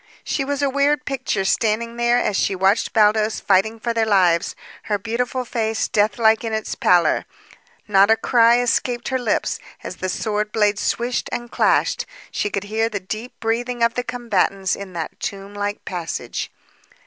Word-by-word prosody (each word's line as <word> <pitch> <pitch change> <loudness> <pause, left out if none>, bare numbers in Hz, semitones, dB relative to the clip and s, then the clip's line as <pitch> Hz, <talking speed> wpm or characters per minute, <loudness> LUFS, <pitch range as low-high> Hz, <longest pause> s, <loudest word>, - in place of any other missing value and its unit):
She 275 - -1
was 285 +1 -2
a - - +3
weird 285 +2 +1
picture 260 -8 -2
standing 230 +3 0
there 240 0 +2
as 210 -4 0
she 195 - +1
watched 190 +4 +2
Baldos 215 0 +3
fighting 205 +3 +2
for 235 +1 -2
their 225 -1 +1
lives, 180 -4 +3 0.3
her 210 -2 0
beautiful 245 +4 -2
face 225 -2 -1
deathlike 220 +2 +2
in 225 -1 -3
its 220 0 -2
pallor. 175 -1 +3 0.6
Not 200 0 +5
a 225 - +6
cry 235 0 +4
escaped 245 0 0
her 260 -1 0
lips, 235 -4 -1 0.2
as - - -7
the 185 - -3
sword 210 +2 -2
blades 210 -2 +1
swished 240 +1 -1
and 240 0 -5
clashed; - - +1 0.2
she 205 - -1
could 200 -1 -3
hear 220 +2 -1
the 205 -2 -3
deep 215 +6 -7
breathing 235 +1 -1
of 230 0 +3
the 250 - -2
combatants 205 -5 0
in 200 -2 -9
that 165 -2 -5
tomb 200 -2 -5
like 205 0 -4
passage. 175 -3 -4
220 Hz, 170 wpm, -21 LUFS, 200-240 Hz, 0.6 s, a